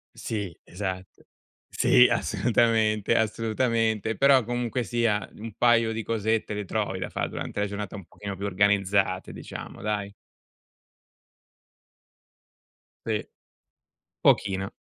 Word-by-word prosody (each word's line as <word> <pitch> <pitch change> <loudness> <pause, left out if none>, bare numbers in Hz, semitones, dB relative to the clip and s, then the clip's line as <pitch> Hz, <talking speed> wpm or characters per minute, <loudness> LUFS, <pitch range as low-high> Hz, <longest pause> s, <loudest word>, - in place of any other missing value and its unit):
Sì, 105 -6 -4
esatto. 95 -1 -6 0.4
Sì, - - +5
assolutamente, 110 -3 +2
assolutamente, 110 0 0
però, 135 -2 +5
comunque 120 +1 -2
sia, 115 -3 0
un 110 0 -7
paio 115 -2 +4
di 110 0 -3
cosette 110 -1 -1
le 105 -1 -4
trovi 100 -1 -2
da 90 - -4
fa - - -2
durante 105 - -4
la - - +2
giornata 100 -1 -5
un 100 -3 -9
pochino 100 +2 -7
più 100 +2 -5
organizzate, 100 -1 +1
diciamo, - - -9
dai. 105 -1 -2 2.9
Sì, - - -1 1.0
pochino. 95 -1 +2
105 Hz, 110 wpm, -26 LUFS, 100-115 Hz, 2.9 s, Sì